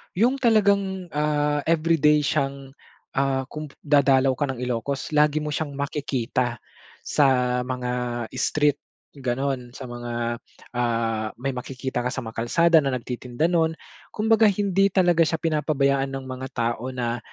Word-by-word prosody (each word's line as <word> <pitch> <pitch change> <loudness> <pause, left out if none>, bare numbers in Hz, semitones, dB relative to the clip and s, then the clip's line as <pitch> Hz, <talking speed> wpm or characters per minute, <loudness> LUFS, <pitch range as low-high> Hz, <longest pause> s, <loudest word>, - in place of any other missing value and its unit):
Yung 250 +7 +2
talagang, 200 -6 +2
ah, 150 0 +1
everyday 155 -2 +3
siyang, 140 -2 -1 0.5
ah, 135 -1 +1
kung 150 0 -6
p 140 - -19
dadalaw 135 -2 +4
ka 145 +2 -1
ng 125 -1 -4
Ilocos, 125 +4 -3
lagi 150 0 +3
mo 150 - -3
siyang 145 -1 -3
makikita 130 -4 -2 0.5
sa 125 -3 +2
mga 125 -1 -3 0.4
street 145 -1 +1 0.4
ganon, 130 -1 -2
sa 135 - -8
mga, 120 -1 -3 0.3
ah, 115 -2 0
may 135 +3 -3
makikita 125 0 -4
ka 125 - -1
sa 125 - -4
mga 110 -1 -9
kalsada 170 +3 +5
na 135 -3 0
nagtitinda 125 +6 -2
nun. 160 -1 +2 0.3
Kumbaga, 220 0 +3
hindi 195 -1 +2
talaga 175 -4 +3
siya 165 - 0
pinapabayaan 145 -4 +1
ng 135 - -5
mga 130 0 -6
tao 120 +1 -1
na 120 -1 -2
140 Hz, 140 wpm, -24 LUFS, 125-160 Hz, 0.5 s, kalsada